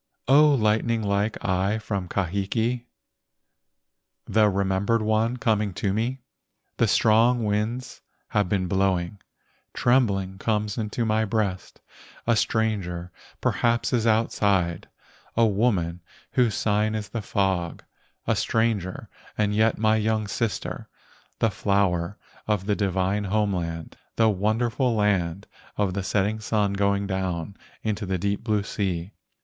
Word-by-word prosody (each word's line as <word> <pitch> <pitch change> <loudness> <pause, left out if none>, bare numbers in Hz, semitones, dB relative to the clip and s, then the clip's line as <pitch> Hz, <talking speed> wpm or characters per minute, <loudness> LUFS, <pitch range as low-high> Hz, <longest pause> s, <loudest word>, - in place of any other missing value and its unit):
O 145 +2 +6
lightning 110 0 +1
like 100 +1 0
eye 95 +3 +1
from 100 -4 -3
Kahiki, 100 +7 -1 1.4
The 110 -1 +3
remembered 100 +3 +1
one 110 +3 +1
coming 110 -6 0
to 95 0 -1
me. 120 +4 -2 0.5
The - - +3
strong 115 +2 +4
winds 110 +4 -2 0.3
have 105 -4 +1
been 95 -2 +1
blowing, 95 0 0 0.6
Trembling 100 -7 +1
comes 105 -1 -1
into 110 +1 -2
my 110 0 +2
breast, 100 -3 -2 0.4
A 115 - +3
stranger 95 -7 -1 0.3
perhaps 115 +1 +1
is 115 -2 +2
outside, 100 -6 +1 0.5
A 115 - +5
woman 95 -6 +1 0.3
whose 120 -5 +2
sign 105 0 +1
is 105 -2 -4
the 115 +2 -4
fog, 95 -4 -1 0.4
A 115 - +2
stranger 110 -3 0 0.3
and 105 -1 +1
yet 110 +1 +2
my 110 0 +3
young 110 -1 0
sister, 110 +1 -3 0.5
The 115 - +2
flower 100 -2 0 0.3
of 105 -3 0
the 105 0 +1
divine 100 0 0
home 105 0 +1
land, 85 -2 -5 0.2
The 115 -1 +4
wonderful 115 +5 +1
land 100 -3 0 0.3
of 100 -3 +1
the 100 - -2
setting 105 +3 0
sun 105 -2 0
Going 100 0 +1
down 95 -1 -3 0.3
into 105 -2 -2
the 95 0 0
deep 100 +2 -2
blue 105 -3 +1
sea. 95 -3 -3
105 Hz, 130 wpm, -25 LUFS, 95-110 Hz, 1.4 s, O